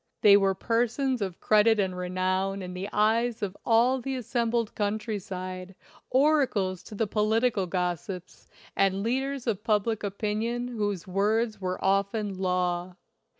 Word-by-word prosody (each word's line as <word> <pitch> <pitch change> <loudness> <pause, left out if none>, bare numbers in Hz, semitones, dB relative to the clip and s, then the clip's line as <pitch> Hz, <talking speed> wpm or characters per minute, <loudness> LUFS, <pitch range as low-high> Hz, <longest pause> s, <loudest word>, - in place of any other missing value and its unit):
They 205 -1 +8
were 195 -1 +3
persons 240 +4 0
of 190 -3 -3
credit 215 +1 +4
and 190 -2 0
renown 185 +2 -1
in 180 0 -6
the 185 +3 -5
eyes 220 +2 +1
of 195 -1 -3
all 245 +3 +3
the 270 +1 -3
assembled 235 -2 -1
coun 205 0 0
try 215 -1 -4
side, 185 0 -7 0.3
oracles 255 - +2
to 215 - -9
the 225 - +1
political 215 -1 +1
gossips, 180 0 -4 0.3
and 195 0 +2
leaders 265 +3 -1
of 210 -4 -1
public 220 0 +1
opinion 220 +4 -2
whose 205 -6 -2
words 210 +3 0
were 185 0 -2
often 200 0 0
law. 180 -1 -1
205 Hz, 145 wpm, -27 LUFS, 185-230 Hz, 0.3 s, They